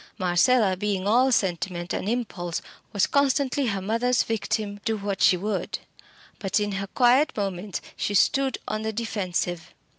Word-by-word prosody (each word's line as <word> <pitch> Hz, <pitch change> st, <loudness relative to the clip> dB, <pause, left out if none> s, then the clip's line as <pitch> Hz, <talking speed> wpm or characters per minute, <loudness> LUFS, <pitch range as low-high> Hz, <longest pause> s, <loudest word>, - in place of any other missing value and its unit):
Marcella 190 Hz, +3 st, +3 dB
being 195 Hz, 0 st, -2 dB
all 250 Hz, +5 st, +4 dB
sentiment 180 Hz, -4 st, -1 dB
and 200 Hz, -, -2 dB
impulse, 200 Hz, -8 st, -3 dB, 0.3 s
was 200 Hz, -2 st, +2 dB
constantly 280 Hz, -1 st, +1 dB
her 195 Hz, -3 st, -2 dB
mother's 230 Hz, +4 st, +2 dB
victim, 210 Hz, -2 st, -2 dB
do 225 Hz, -1 st, 0 dB
what 200 Hz, -1 st, -3 dB
she 180 Hz, -, +6 dB
would. 205 Hz, +2 st, -2 dB, 0.6 s
But 195 Hz, +2 st, 0 dB
in 205 Hz, 0 st, -1 dB
her 195 Hz, 0 st, -3 dB
quiet 250 Hz, +7 st, +3 dB
moments 195 Hz, -1 st, -3 dB
she 205 Hz, -, -2 dB
stood 270 Hz, +6 st, +3 dB
on 215 Hz, 0 st, -2 dB
the 220 Hz, 0 st, -3 dB
defensive. 180 Hz, -6 st, -3 dB
205 Hz, 150 wpm, -25 LUFS, 190-235 Hz, 0.6 s, she